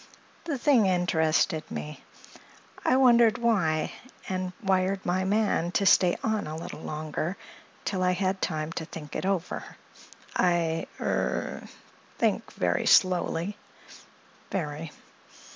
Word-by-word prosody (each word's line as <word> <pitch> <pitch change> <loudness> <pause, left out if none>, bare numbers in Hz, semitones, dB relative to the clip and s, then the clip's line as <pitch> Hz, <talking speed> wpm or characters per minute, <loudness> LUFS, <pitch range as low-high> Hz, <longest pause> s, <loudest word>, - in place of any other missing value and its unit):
"The 305 -5 -2
thing 245 -5 +4
interested 165 -2 +1
me. 75 0 -6 0.8
I 255 - +3
wondered 235 -4 +5
why, 180 -10 +1 0.4
and 185 -1 -2
wired 190 0 +1
my 185 +1 +1
man 200 -4 +1
to 200 - +2
stay 180 -2 +5
on 220 -5 0
a 155 - -5
little 160 -1 -7
longer, 155 +4 -4 0.5
till 190 -2 -1
I 180 0 +3
had 190 +1 -1
time 155 -1 -2
to 165 - -4
think 150 -2 -9
it - - -2
over. 185 -3 -1 0.7
I—er—think 170 -2 -2
very - - 0
slowly. 185 +1 +3 0.9
Very. 155 -4 -4
180 Hz, 110 wpm, -27 LUFS, 160-195 Hz, 0.9 s, wondered